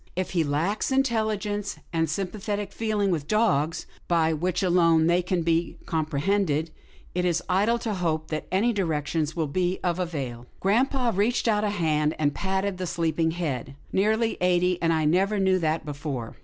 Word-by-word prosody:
If 185 +1 -2
he 170 -3 +2
lacks 160 - -1
intelligence 215 -6 0 0.2
and 165 -1 +1
sympathetic 200 +3 -3
feeling 210 -3 0
with 155 -4 -2
dogs, 165 -8 +1 0.2
by 165 -2 +2
which 180 +4 -1
alone 165 -3 +4
they 175 +2 +3
can 180 -1 -1
be 165 +1 0
com 160 -2 -1
prehended, 160 0 0 0.4
it 180 - 0
is 175 -2 +1
idle 205 +6 +2
to 230 -2 -3
hope 160 -4 -1
that 155 -1 -3
any 215 +6 +2
directions 160 -4 -1
will 165 -2 0
be 180 +5 -1
of 175 0 0
avail.' 135 -9 -4
" - - -35
Grampa 245 +5 +2
reached 220 +5 +1
out 210 -2 +2
a 210 - +1
hand, 155 -6 +1
and 145 -2 +1
patted 190 0 -2
the 185 - -2
sleep 165 -2 -1
ing 160 0 +3
head. 140 -6 -3
" - - -27
Nearly 220 +3 +2
eighty, 180 0 +2
and 165 -1 +2
I 160 -1 +1
never 190 +7 +2
knew 190 -1 +3
that 160 -1 -1
before." 145 -5 -5
175 Hz, 185 wpm, -26 LUFS, 160-200 Hz, 0.4 s, alone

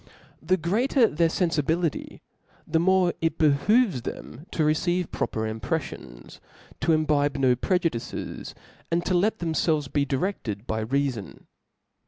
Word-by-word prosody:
The 185 - +2
greater 230 - +2
their 165 -4 +2
ienfibilicy, 165 -1 -1 0.4
the 160 +1 +1
more 185 0 +3
it 165 -1 0
behoves 160 - +3
them 140 +6 -8
to 160 - -1
receive 175 +3 0
proper 110 0 -2
im 110 0 -4
preifions, - - -5 0.4
to 150 +4 +1
imbibe 150 -2 +2
no 130 -2 +3
prejudices, 165 -3 -2 0.3
and 170 +1 0
.to 185 - 0
let 210 +5 +2
themfslvcs 160 -4 0
be 145 -1 +1
direfted 130 - -2
by 110 -2 -2
reafon. 130 -3 -2
155 Hz, 130 wpm, -25 LUFS, 135-180 Hz, 0.4 s, more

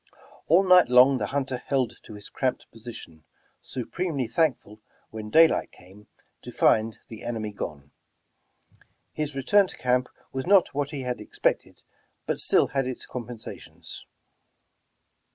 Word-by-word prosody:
All 175 +5 +5
night 180 -4 +7
long 125 +1 +6
the - - -2
hunter 135 -2 -2
held 130 -4 -1
to 110 - -10
his 105 - -11
cramped 130 -2 -3
position, 110 -9 -11 0.4
supremely 140 +2 -3
thank 155 +1 +2
ful 105 +1 -17 0.3
when 110 -1 -7
daylight 160 +7 +4
came, 95 +4 -18 0.3
to - - -9
find 110 0 +2
the 110 - -10
enemy 110 -3 -4
gone. 70 -8 -7 1.2
His 150 -2 -3
return 195 +9 +3
to - - -10
camp 125 0 +1 0.2
was 130 +2 -4
not 195 -5 +4
what 145 0 -1
he 140 -3 -5
had 125 -1 -3
expected, - - -2 0.4
but - - -2
still - - +3
had 135 -1 -1
its 130 - -5
compensations. 120 -2 -9
125 Hz, 140 wpm, -26 LUFS, 110-145 Hz, 1.2 s, night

